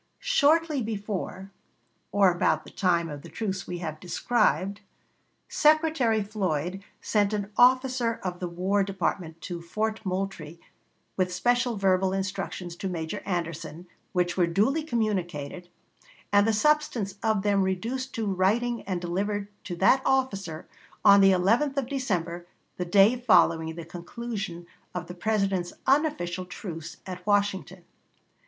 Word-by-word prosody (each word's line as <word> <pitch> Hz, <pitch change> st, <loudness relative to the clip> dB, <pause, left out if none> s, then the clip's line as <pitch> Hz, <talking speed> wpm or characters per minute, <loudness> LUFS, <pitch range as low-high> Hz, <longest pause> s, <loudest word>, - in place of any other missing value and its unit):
Shortly 310 Hz, -1 st, +2 dB
before, 200 Hz, -3 st, -4 dB, 0.6 s
or 200 Hz, -2 st, +5 dB
about 160 Hz, -3 st, +1 dB
the -, -, -13 dB
time 170 Hz, -3 st, +1 dB
of 145 Hz, -2 st, -7 dB
the 170 Hz, -, -11 dB
truce 190 Hz, +2 st, -4 dB
we 180 Hz, -, -4 dB
have 155 Hz, -1 st, -5 dB
described, 200 Hz, +1 st, 0 dB, 0.7 s
Secretary 300 Hz, -8 st, +3 dB
Floyd 190 Hz, -3 st, -2 dB, 0.2 s
sent 205 Hz, -1 st, +1 dB
an 205 Hz, -1 st, -3 dB
officer 255 Hz, -2 st, +3 dB
of 180 Hz, -1 st, -4 dB
the 180 Hz, -, -3 dB
War 185 Hz, +4 st, 0 dB
Department 180 Hz, -4 st, -3 dB
to 175 Hz, -3 st, -5 dB
Fort 215 Hz, +6 st, -2 dB
Moultrie 185 Hz, -4 st, -4 dB, 0.6 s
with 185 Hz, -1 st, +1 dB
special 245 Hz, +4 st, +1 dB
verbal 190 Hz, -1 st, +2 dB
instructions 190 Hz, -2 st, -4 dB
to 190 Hz, -, -3 dB
Major 170 Hz, +3 st, -4 dB
Anderson, 170 Hz, -2 st, -4 dB, 0.3 s
which 180 Hz, -1 st, 0 dB
were 175 Hz, -2 st, +3 dB
duly 215 Hz, -, +2 dB
communicated, 185 Hz, -, -2 dB, 0.6 s
and 205 Hz, +1 st, +5 dB
the -, -, +4 dB
substance 275 Hz, -4 st, +1 dB
of 220 Hz, -3 st, +1 dB
them 200 Hz, -1 st, +3 dB
reduced 230 Hz, +8 st, -2 dB
to 225 Hz, -2 st, -2 dB
writing 210 Hz, +5 st, +1 dB
and 185 Hz, -3 st, -2 dB
delivered 200 Hz, +4 st, -2 dB, 0.2 s
to 175 Hz, -, -4 dB
that 195 Hz, +9 st, +4 dB
officer 195 Hz, -12 st, -1 dB, 0.4 s
on 200 Hz, 0 st, +8 dB
the 195 Hz, -, +7 dB
11th 225 Hz, +10 st, +2 dB
of 275 Hz, -, +1 dB
December, 180 Hz, -11 st, -2 dB, 0.3 s
the 180 Hz, -, -2 dB
day 200 Hz, +6 st, +5 dB
following 165 Hz, -9 st, +3 dB
the 170 Hz, -1 st, -7 dB
conclusion 180 Hz, 0 st, -6 dB, 0.3 s
of 180 Hz, -1 st, -3 dB
the 180 Hz, -, -8 dB
President's 195 Hz, -2 st, 0 dB
unofficial 225 Hz, -, +1 dB
truce 165 Hz, -3 st, -7 dB
at 180 Hz, -1 st, -7 dB
Washington. 200 Hz, -3 st, 0 dB
195 Hz, 135 wpm, -27 LUFS, 175-225 Hz, 0.7 s, on